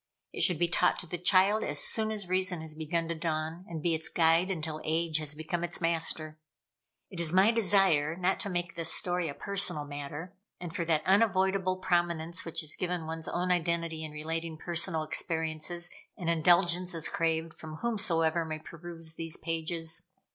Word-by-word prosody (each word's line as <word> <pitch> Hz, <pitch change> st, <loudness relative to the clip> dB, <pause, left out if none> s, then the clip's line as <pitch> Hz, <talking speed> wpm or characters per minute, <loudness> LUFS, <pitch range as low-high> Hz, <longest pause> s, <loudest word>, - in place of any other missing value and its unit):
It -, -, -3 dB
should 180 Hz, -4 st, +4 dB
be 175 Hz, +2 st, +2 dB
taught 180 Hz, +1 st, +2 dB
to -, -, -4 dB
the 175 Hz, +1 st, -4 dB
child 190 Hz, +4 st, +4 dB
as -, -, -1 dB
soon 220 Hz, -1 st, +3 dB
as 210 Hz, -4 st, -4 dB
reason 185 Hz, -2 st, 0 dB
has 160 Hz, -1 st, -5 dB
begun 160 Hz, +2 st, -2 dB
to -, -, 0 dB
dawn, 160 Hz, +1 st, -3 dB
and 160 Hz, -3 st, -6 dB
be 170 Hz, -, +2 dB
its 160 Hz, 0 st, -3 dB
guide 165 Hz, +2 st, +3 dB
until 160 Hz, -4 st, -3 dB
age 160 Hz, 0 st, +1 dB
has 150 Hz, -1 st, -4 dB
become 160 Hz, +3 st, -3 dB
its 175 Hz, -, -2 dB
master. 160 Hz, -2 st, -1 dB, 0.7 s
It 180 Hz, -, -7 dB
is 165 Hz, -2 st, +2 dB
my 190 Hz, +5 st, +5 dB
desire 190 Hz, -8 st, +3 dB
not 185 Hz, +2 st, 0 dB
to 200 Hz, -, -2 dB
make 175 Hz, -2 st, -2 dB
this 165 Hz, -1 st, +1 dB
story 175 Hz, -2 st, +1 dB
a 140 Hz, -, -6 dB
personal 195 Hz, -7 st, +2 dB
matter; 145 Hz, +5 st, -7 dB, 0.3 s
and 175 Hz, -1 st, -7 dB
for 175 Hz, -, 0 dB
that 160 Hz, -2 st, +1 dB
unavoidable 190 Hz, -2 st, +2 dB
prominence 175 Hz, -2 st, 0 dB
which 165 Hz, -1 st, -3 dB
is 150 Hz, -, -5 dB
given 180 Hz, -2 st, -2 dB
one's 160 Hz, 0 st, -5 dB
own 180 Hz, +1 st, -1 dB
identity 170 Hz, -2 st, -1 dB
in 155 Hz, -, -6 dB
relating 160 Hz, +1 st, -4 dB
personal 170 Hz, -1 st, -1 dB
experiences, 160 Hz, +2 st, -2 dB, 0.3 s
an 170 Hz, -2 st, -3 dB
indulgence 175 Hz, +2 st, +3 dB
is 160 Hz, -, +1 dB
craved 165 Hz, -1 st, -1 dB
from 155 Hz, -1 st, -9 dB
whomsoever 170 Hz, -6 st, +1 dB
may 160 Hz, -1 st, -4 dB
peruse 165 Hz, 0 st, -2 dB
these 165 Hz, -1 st, -1 dB
pages. 165 Hz, 0 st, -2 dB
170 Hz, 185 wpm, -30 LUFS, 160-180 Hz, 0.7 s, my